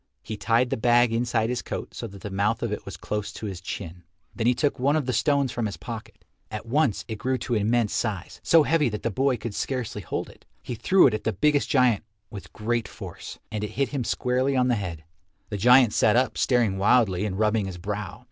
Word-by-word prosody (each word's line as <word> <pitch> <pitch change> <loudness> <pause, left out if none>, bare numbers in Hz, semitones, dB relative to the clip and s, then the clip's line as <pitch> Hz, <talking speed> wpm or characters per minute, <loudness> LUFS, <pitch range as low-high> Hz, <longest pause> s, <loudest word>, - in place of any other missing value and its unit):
He 110 - -5
tied 115 +4 +1
the - - 0
bag 120 0 +4
inside 115 -1 0
his 125 - -2
coat - - -6
so 115 - -5
that 100 -2 -12
the 105 - -6
mouth 105 +3 0
of - - -1
it - - -4
was - - -7
close 105 -1 -4
to - - -7
his 95 -3 -5
chin. 90 -2 -7 0.3
Then 115 -1 0
he 125 - +4
took 145 -1 0
one 140 +4 +2
of 155 -4 0
the 130 - -1
stones 140 +1 +2
from 120 -3 -2
his 100 - -6
pocket. - - -9 0.2
At 105 -1 -6
once 130 -2 +1
it 110 -3 -5
grew 130 +3 0
to 120 0 -3
immense 110 0 +1
size, 100 -5 -3
so 165 -2 +5
heavy 150 -3 +2
that 105 -1 -5
the 115 - 0
boy 130 +3 +1
could 110 0 -5
scarcely 120 -3 -3
hold 85 - -4
it. - - -17 0.2
He - - -5
threw 185 - +4
it 125 - +4
at 110 - -3
the 110 - +1
biggest 150 -2 +2
giant 125 -6 +3 0.3
with 100 -3 -9
great 115 +1 -2
force, - - -9
and 105 -1 -3
it 105 - -4
hit 140 -1 +1
him 140 -4 -2
squarely 130 +3 0
on 125 -1 +2
the - - +3
head. 85 -7 -5 0.5
The 105 - -3
giant 125 +2 +6
sat 110 - +3
up 125 -3 +2
staring 115 -7 +2
wildly 100 -3 +3
and 100 -3 -2
rubbing 105 -1 +1
his 95 -2 -6
brow. 105 +2 -5
115 Hz, 235 wpm, -25 LUFS, 105-125 Hz, 0.5 s, giant